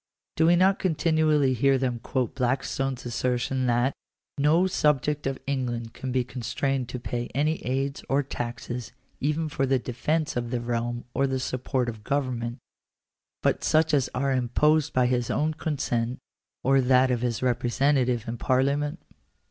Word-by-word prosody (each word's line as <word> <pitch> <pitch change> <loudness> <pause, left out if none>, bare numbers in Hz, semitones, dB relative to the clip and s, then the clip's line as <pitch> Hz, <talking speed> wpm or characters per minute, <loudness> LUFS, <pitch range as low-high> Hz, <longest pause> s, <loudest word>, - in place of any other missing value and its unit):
Do 160 - +3
we 175 - +6
not 190 +2 +4
continually 155 -5 +2
hear 135 +2 +3
them 125 -2 -1
quote 125 0 -2
Blackstone's 130 0 -1
assertion 125 +2 -1
that 120 +3 +2 0.3
" - - -63
no 155 +6 +4
subject 150 -4 +1
of 135 -1 -2
England 120 -4 -2
can 130 - -5
be 125 0 +1
constrained 130 +1 -2
to 125 - -5
pay 120 0 -3
any 155 +3 0
ai&a_jM? 135 +1 -1
taxes 120 -1 -5 0.3
even 150 +3 0
for 135 -2 -1
the 135 0 +3
defence 150 +6 -1
of 120 -1 -2
the 125 0 -1
realm 120 0 -2
or 140 - +2
the 130 0 -1
support 130 0 -1
of 110 -2 -6
government, 125 -3 -2 0.9
but - - +1
such 155 0 +3
as 135 -3 +2
are 135 +2 +1
imposed 150 +5 +2
by 125 -1 +3
his 125 -1 0
own 155 +2 +1
consent, 130 -6 -2 0.5
or 135 +1 +4
that 130 0 +4
of 120 -2 0
his 120 -1 -1
representative 125 0 +1
in 115 +1 -3
parliament 140 +5 +1
130 Hz, 155 wpm, -26 LUFS, 120-145 Hz, 0.9 s, we